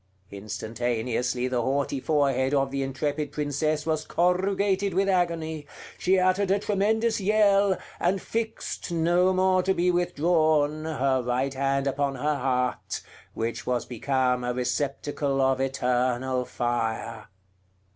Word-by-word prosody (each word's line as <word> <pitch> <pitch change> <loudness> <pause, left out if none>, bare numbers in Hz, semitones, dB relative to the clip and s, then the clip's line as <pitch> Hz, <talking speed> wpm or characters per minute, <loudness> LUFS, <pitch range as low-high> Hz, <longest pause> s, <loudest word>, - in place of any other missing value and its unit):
Instantaneously 115 +4 -2
the 125 -1 0
haughty 135 +2 -1
forehead 135 -2 +1
of 135 -1 +1
the 140 0 -2
intrepid 145 +2 -2
princess 150 +1 -1
was 155 -1 0
corrugated 190 +2 +1
with 195 +1 +2
agony; 165 -5 -1 0.3
she 190 +1 +3
uttered 185 +1 +2
a 195 - +4
tremendous 215 +2 +1
yell, 200 -1 +3 0.2
and 190 +3 +1
fixed, 225 -3 -4
no 175 +2 +3
more 185 0 +3
to 190 +1 +1
be 180 +1 +2
withdrawn, 155 -3 +1
her 135 -4 +1
right 125 +3 -1
hand 135 0 0
upon 140 0 0
her 150 +4 0
heart, 125 -1 -1 0.3
which 115 +1 -3
was 125 -1 0
become 125 0 0
a 125 0 -2
receptacle 135 +2 -1
of 130 0 +2
eternal 125 -1 0
fire. 115 -2 -3
145 Hz, 125 wpm, -26 LUFS, 125-180 Hz, 0.3 s, a